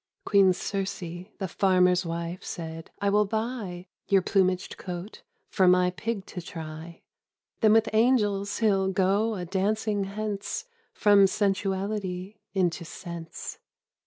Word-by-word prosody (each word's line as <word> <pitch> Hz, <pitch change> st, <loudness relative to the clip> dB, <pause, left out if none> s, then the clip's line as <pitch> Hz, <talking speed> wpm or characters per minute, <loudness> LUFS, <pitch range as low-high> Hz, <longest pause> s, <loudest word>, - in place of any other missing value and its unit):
Queen 195 Hz, -2 st, +5 dB
Circe, 195 Hz, +1 st, -2 dB, 0.4 s
the 190 Hz, -, -3 dB
farmer's 180 Hz, -1 st, +3 dB
wife, 170 Hz, +2 st, -4 dB
said, 165 Hz, -1 st, -6 dB
" -, -, -34 dB
I 200 Hz, -, +3 dB
will 210 Hz, +1 st, +4 dB
buy 215 Hz, -5 st, -3 dB, 0.2 s
Your 195 Hz, -2 st, +4 dB
plumaged 185 Hz, -2 st, +1 dB
coat 180 Hz, +3 st, -7 dB, 0.3 s
for 190 Hz, -2 st, +3 dB
my 180 Hz, 0 st, +5 dB
pig 205 Hz, +1 st, -4 dB
to 180 Hz, -, -7 dB
try 165 Hz, -1 st, -8 dB, 0.3 s
— -, -, -54 dB
Then 215 Hz, -2 st, +6 dB
with 225 Hz, 0 st, +4 dB
angels 210 Hz, -4 st, +2 dB
he'll 195 Hz, -4 st, +2 dB
go 200 Hz, +4 st, +2 dB
a 180 Hz, -2 st, -4 dB
dancing 205 Hz, +2 st, 0 dB
hence, 205 Hz, -, -4 dB, 0.3 s
From 205 Hz, -2 st, +6 dB
sensuality 195 Hz, 0 st, -1 dB, 0.2 s
into 175 Hz, -2 st, +1 dB
sense 170 Hz, -1 st, -8 dB
195 Hz, 130 wpm, -27 LUFS, 180-205 Hz, 0.4 s, Then